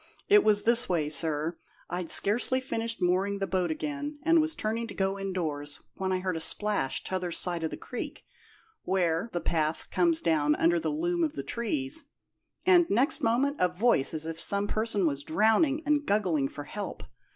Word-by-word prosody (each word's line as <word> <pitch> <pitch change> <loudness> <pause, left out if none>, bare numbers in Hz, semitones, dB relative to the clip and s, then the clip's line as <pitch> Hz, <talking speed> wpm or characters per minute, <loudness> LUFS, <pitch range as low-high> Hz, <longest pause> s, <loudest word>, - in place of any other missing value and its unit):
'It 415 0 +6
was 210 -1 +3
this 235 +1 +3
way, 165 -5 0
sir: 155 +2 -2 0.3
I'd 175 -1 -4
scarcely 240 +5 +4
finished 230 -5 -3
mooring 190 +3 +1
the 195 - -2
boat 185 -3 -1
again, 290 - -4
and 330 0 +4
was 315 +1 -2
turning 225 +2 -2
to 205 - -9
go 195 0 -1
indoors, 155 -7 -4
when 190 -1 -3
I 185 0 0
heard 185 -2 -2
a - - -3
splash, 160 -3 -1
t'other 185 -2 -3
side 170 0 -2
of 160 - -1
the - - -7
creek, 250 - -7 0.6
where; 180 +2 0
the 175 - -2
path 160 -2 -2
comes 335 -2 +2
down 150 -2 +2
under 170 +1 +2
the - - -2
loom 345 +3 -1
of 305 -2 -1
the - - -5
trees, 155 - -2 0.6
and, 355 -2 +5
next 265 +9 +2
moment, 265 +6 +1
a 180 - +4
voice 180 - +4
as 160 -1 0
if 165 0 -4
some 200 0 0
person 215 -2 -1
was 140 -3 -1
drowning 225 - +2
and 295 0 +2
guggling 180 - +1
for 145 - -8
help. 200 +8 -7
195 Hz, 185 wpm, -28 LUFS, 165-240 Hz, 0.6 s, It